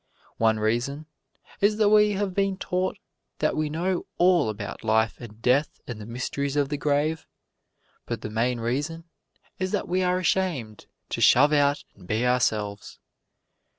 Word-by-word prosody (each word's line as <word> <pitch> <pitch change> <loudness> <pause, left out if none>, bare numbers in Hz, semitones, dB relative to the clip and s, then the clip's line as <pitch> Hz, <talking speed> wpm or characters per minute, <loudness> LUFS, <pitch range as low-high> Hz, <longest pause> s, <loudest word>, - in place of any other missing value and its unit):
One 110 -1 +3
reason 120 +8 -1 0.5
is 210 +1 +3
that 215 -2 +4
we 210 0 +5
have 200 -1 -2
been 195 0 0
taught 185 +1 -2 0.4
that 155 - 0
we 155 -1 -1
know 175 +4 -2
all 175 -8 +4
about 105 0 -6
life 110 +1 +1
and 110 -2 -10
death 135 +4 +2
and 115 -3 -7
the 105 - -9
mysteries 135 +4 -3
of 145 -2 +1
the 145 - -2
grave. 150 +2 0 0.8
But - - -4
the 105 - -6
main 120 +2 0
reason 145 +8 -2 0.6
is 185 0 -1
that 205 - -1
we 185 +1 0
are 180 0 +2
ashamed 170 - -1 0.2
to - - -3
shove 145 +1 +6
out 145 0 +2
and 90 -3 -17
be 110 +5 0
ourselves. 110 -5 0
145 Hz, 160 wpm, -25 LUFS, 115-180 Hz, 0.8 s, shove